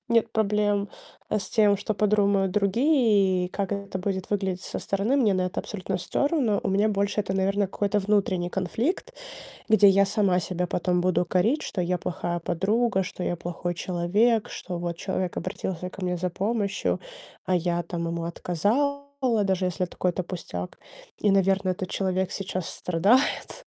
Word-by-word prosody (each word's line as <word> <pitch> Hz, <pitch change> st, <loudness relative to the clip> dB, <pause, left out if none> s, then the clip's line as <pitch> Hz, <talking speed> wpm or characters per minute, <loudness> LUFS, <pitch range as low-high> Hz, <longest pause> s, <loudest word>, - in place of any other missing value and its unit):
нет 230 Hz, -1 st, +2 dB
проблем, 205 Hz, -1 st, +1 dB, 0.4 s
э, 215 Hz, -, +2 dB
с 195 Hz, -, -5 dB
тем, 210 Hz, -2 st, +4 dB
что 205 Hz, +2 st, -2 dB
подумают 200 Hz, -2 st, +2 dB
другие 210 Hz, -4 st, +3 dB
и -, -, -9 dB
как 200 Hz, +1 st, -3 dB
это 200 Hz, -1 st, -4 dB
будет 190 Hz, 0 st, -3 dB
выглядеть 190 Hz, -3 st, -1 dB
со -, -, -5 dB
стороны. 200 Hz, +7 st, 0 dB
Мне 220 Hz, -8 st, +3 dB
на 185 Hz, -, +1 dB
это 180 Hz, -, -3 dB
абсолютно 190 Hz, -2 st, -4 dB
всё 280 Hz, -, 0 dB
равно. 255 Hz, -10 st, +1 dB
У -, -, -1 dB
меня 205 Hz, +3 st, +3 dB
больше 200 Hz, 0 st, 0 dB
это, 190 Hz, -2 st, -3 dB
наверное, 195 Hz, +1 st, +1 dB
какой-то 205 Hz, +2 st, 0 dB
внутренний 195 Hz, -3 st, +1 dB
конфликт, 225 Hz, -, -2 dB, 0.6 s
где 215 Hz, -2 st, +7 dB
я 195 Hz, +1 st, +5 dB
сама 195 Hz, -3 st, +2 dB
себя 180 Hz, 0 st, -2 dB
потом 180 Hz, 0 st, 0 dB
буду 180 Hz, -1 st, +2 dB
корить, 205 Hz, -, +2 dB
что 185 Hz, -, -3 dB
я 180 Hz, +1 st, 0 dB
плохая 175 Hz, 0 st, -3 dB
подруга, 195 Hz, +5 st, +1 dB
что 185 Hz, -1 st, -6 dB
я 175 Hz, -, -1 dB
плохой 175 Hz, +1 st, -4 dB
человек, 200 Hz, +7 st, +1 dB
что 180 Hz, -2 st, -6 dB
вот 170 Hz, -1 st, -3 dB
человек 185 Hz, 0 st, -3 dB
обратился 180 Hz, 0 st, -4 dB
ко 190 Hz, -, -10 dB
мне 180 Hz, 0 st, 0 dB
за 180 Hz, +1 st, -2 dB
помощью, 205 Hz, +2 st, -1 dB, 0.5 s
а 185 Hz, -, +1 dB
я 175 Hz, 0 st, 0 dB
там 170 Hz, -1 st, -4 dB
ему 170 Hz, 0 st, -3 dB
отказала, 220 Hz, -, 0 dB, 0.4 s
даже 190 Hz, -1 st, +1 dB
если 180 Hz, +1 st, -1 dB
это 180 Hz, -, -10 dB
какой-то 180 Hz, 0 st, 0 dB
пустяк, 90 Hz, -, -6 dB, 0.4 s
и, 210 Hz, -, +2 dB
наверное, 195 Hz, -1 st, +3 dB
этот 185 Hz, 0 st, -5 dB
человек 190 Hz, -1 st, 0 dB
сейчас 185 Hz, -3 st, -3 dB
страдает. 230 Hz, -, +1 dB
195 Hz, 170 wpm, -26 LUFS, 180-210 Hz, 0.6 s, где